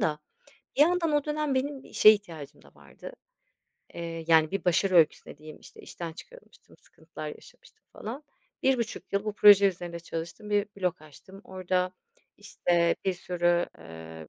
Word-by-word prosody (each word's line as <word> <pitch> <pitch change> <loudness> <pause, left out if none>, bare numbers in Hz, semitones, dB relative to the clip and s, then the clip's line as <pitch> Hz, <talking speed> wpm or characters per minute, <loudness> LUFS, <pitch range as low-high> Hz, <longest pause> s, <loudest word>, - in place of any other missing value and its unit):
da 150 -1 0 0.6
bir 285 - +3
yandan 340 0 +3
o 295 -1 +1
dönem 300 -2 -1
benim 270 +1 -2
işe 215 - +6
ihtiyacım 165 -9 -1
da - - -20
vardı. - - -12 0.8
Iıı, 165 -1 -6
yani, 160 -1 +4
bir 195 -2 -3
başarı 185 +2 +2
öyküsü 160 -3 +4
dediğim, 155 +1 -12
işte, - - -15
işten 170 -2 -8
çıkarılmıştım, - - -16
sıkıntılar - - -10
yaşamıştım - - -15
falan. 240 +7 -7 0.4
1.5 245 -4 -1
yıl 200 +1 0
bu 215 - -2
proje 205 -1 +7
üzerinde 175 -2 -6
çalıştım, 170 +5 -7
bir 205 0 +2
blog 180 -4 -2
açtım. 190 +6 -15
Orada, 185 -1 -2 0.4
işte, 175 -4 0
bir 190 - +1
sürü, 175 -1 0
ııı, 80 -1 -11
185 Hz, 150 wpm, -27 LUFS, 165-215 Hz, 0.8 s, proje